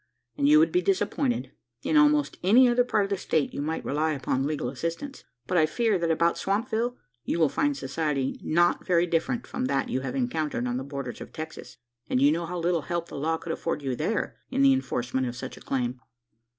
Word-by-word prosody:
"And 285 0 +2
you 305 - +8
would 320 +2 +4
be 360 - +2
disappointed. 275 - 0 0.3
In - - 0
almost 300 -1 +4
any 235 +8 +6
other 245 0 +4
part 220 -4 +1
of 200 - -4
the 200 - +1
state, 155 -4 0
you - - -3
might 160 +2 -3
rely 155 +2 0
upon 135 -1 -1
legal 150 -5 -2
assistance; 165 - -5 0.2
but, 180 +6 +2
I 155 - +4
fear, 220 +2 +1
that 170 -1 0
about 170 +1 +2
Swampville 230 +4 -1 0.3
you - - -1
will 160 -3 +4
find 290 - 0
society 150 - -2
not 175 +2 +2
very 175 -2 +3
different 170 +8 -1
from 255 - -3
that 260 - 0
you 130 - -1
have 130 -1 -4
encountered 135 0 -1
on 125 0 -1
the 130 - -3
borders 140 -3 -6
of - - -9
Texas; 160 -4 -8 0.3
and 125 - +2
you 140 +2 +5
know 165 +1 -1
how 180 +1 -4
little 170 -1 +1
help 170 +2 -3
the - - -8
law 160 +3 0
could 165 - -6
afford 160 -3 -3
you 130 -2 -1
there, 190 - -2
in 270 +1 +1
the 275 -1 +7
enforcement 130 - -1
of 120 - -5
such 130 +1 -6
a - - -14
claim?" 125 -1 -2
165 Hz, 220 wpm, -27 LUFS, -, 0.3 s, you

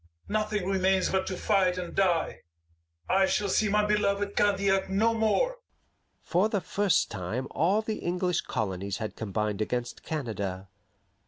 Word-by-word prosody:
Nothing 210 -3 -1
remains 190 0 +2
but 190 0 0
to 185 - -3
fight 190 -4 +2
and 180 -1 -5
die. 180 -4 +1 0.7
I 190 +1 +3
shall 205 +1 0
see 215 +2 +2
my 210 +1 +3
beloved 205 -1 0
Candiac 195 -1 +2
no 220 +4 +2
more." 230 - +1 0.7
For 185 +5 +2
the 210 - 0
first 195 +2 +1
time 110 +7 -3
all 190 +8 +2
the 215 0 -3
English 180 0 0
colonies 100 -2 -3
had 110 -2 -5
combined 105 -1 -2
against 120 +2 -3
Canada. 100 -10 -4
190 Hz, 145 wpm, -28 LUFS, 125-205 Hz, 0.7 s, I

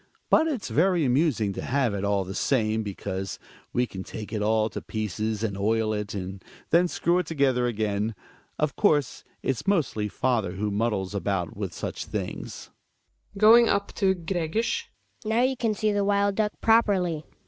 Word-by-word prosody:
But 320 - +5
it's 265 -10 -3
very 175 -1 +3
amusing 125 -6 +2
to - - -5
have 130 -4 0
it, 100 -1 -3
all 100 -1 +1
the 95 +1 -7
same, 110 -1 +1
because 95 -2 -4 0.3
we 125 - +1
can 95 -5 -7
take 110 +2 -8
it 105 - -1
all 110 +1 +2
to - - -5
pieces, 110 0 -3
and 105 -3 -1
oil 110 +2 +1
it, 105 -1 -4
and 95 0 -6 0.3
then 175 +2 +5
screw 175 +1 +1
it 180 - -3
together 135 -5 +2
again. 105 -1 -1 0.4
Of 150 -1 0
course 150 - +2 0.2
its 135 - -2
mostly 145 - +1
father 110 -4 0
who 105 +2 -2
muddles 105 -2 -1
about 95 -4 -2
with - - -4
such - - -5
things. - - -6 0.6
Hedvig 195 - -8
{going 230 +2 +8
up 200 0 0
to 190 -1 +2
Gregers). 175 +5 -1 0.4
Now 225 +2 +2
you 260 +1 +2
can 225 -3 0
see 215 +1 +1
the 205 -1 +1
wild 200 0 +2
duck 210 +1 0
properly. 195 -8 +3
125 Hz, 175 wpm, -26 LUFS, -, 0.6 s, going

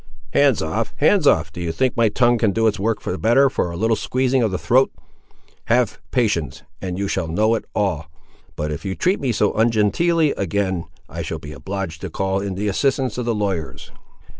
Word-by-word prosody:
"Hands - - +4
off—hands 190 -8 +1
off—do 80 - +2
you 85 -1 -2
think 125 +10 0
my 115 -3 +3
tongue 120 +2 +2
can 110 -3 +2
do 115 +2 +1
its 105 -2 +1
work 105 0 -1
the 90 - -3
better, 130 +5 +4
for 90 - -1
a 85 - -6
little 110 +3 +2
squeezing 130 +3 0
of 115 - +2
the 95 - -2
throat! 120 - +3 0.7
Have 120 -2 +1
patience, 85 - -1 0.2
and 90 -1 -4
you 100 0 -1
shall 85 - -2
know 105 +7 +2
it 115 - -2
all; 85 -7 -1 0.5
but 75 +1 -3
if 75 - -5
you 95 -2 -3
treat 185 +2 +1
me 130 -3 0
so 105 -2 +1
ungenteelly 120 - +2
again, 95 -2 -1 0.2
I - - -6
shall - - -4
be 75 - -9
obliged 85 +3 -5
to 95 - -5
call 95 +3 -1
in 100 -1 -4
the 105 +2 -2
assistance 130 +3 0
of 125 - -2
the 120 -1 0
lawyers." 90 -11 -3
105 Hz, 200 wpm, -21 LUFS, 90-120 Hz, 0.7 s, Hands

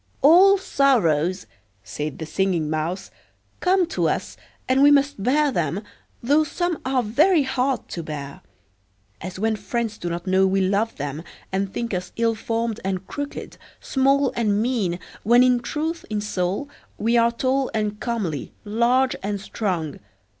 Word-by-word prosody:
"All 370 +7 +7
sorrows," 190 - +2 0.4
said 150 +6 -5
the 160 - -5
Singing 170 -2 0
Mouse, 160 +4 -3 0.5
"come 370 0 +3
to - - 0
us, - - -3 0.3
and 260 +1 +3
we 285 - +8
must 280 -5 +3
bear 285 +6 +2
them, 170 - -1 0.4
though 290 +6 +4
some 345 +2 -2
are 260 -1 +1
very 300 - +3
hard 265 0 -1
to 170 - -4
bear; 145 -3 -7 0.8
as 185 0 -6
when 220 +2 0
friends 215 +1 -3
do 175 - -3
not 170 +1 -4
know 190 0 +3
we 195 +1 +1
love 200 +4 +1
them, 145 +2 -4 0.3
and 195 0 -1
think 235 0 -3
us 180 -1 -4
ill 230 0 +2
formed 225 0 -2
and 190 -1 -2
crooked, 285 +5 -6 0.2
small 275 0 +2
and 210 -3 +1
mean, 215 -7 0 0.2
when 240 +3 +5
in 250 -1 +4
truth 315 +6 -3
in 215 -1 -1
soul 200 +4 -2 0.3
we 230 +3 +1
are 235 0 +4
tall 260 +2 0
and 210 -1 -1
comely, 205 - -3
large 240 +5 +2
and 205 +1 -2
strong. 180 -7 -3
225 Hz, 155 wpm, -23 LUFS, 185-265 Hz, 0.8 s, we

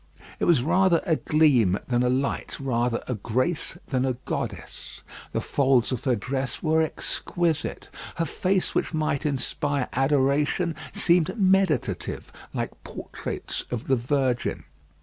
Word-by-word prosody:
It - - +1
was 160 -8 +4
rather 180 +2 +3
a 160 - +3
gleam 130 - +3
than 120 -1 +1
a 125 - +2
light 135 +2 -1
rather 120 -3 0
a 125 - -1
grace 130 - -1
than 130 -2 +1
a 130 -1 +1
goddess; - - -5 0.3
the - - -1
folds 135 -4 +2
of 125 - -3
her 130 -3 +3
dress 130 +4 -3
were 160 0 +3
exquisite; 165 +1 -1 0.3
her 165 - 0
face 185 +4 0
which - - -1
might 155 -1 0
inspire 140 0 -1
adoration, 145 +5 +2 0.2
seemed 170 +4 +2
meditative, 190 - +1 0.2
like - - -5
portraits - - -5
of 120 -2 -4
the 135 - +3
Virgin. 125 0 0
140 Hz, 135 wpm, -25 LUFS, 125-160 Hz, 0.3 s, was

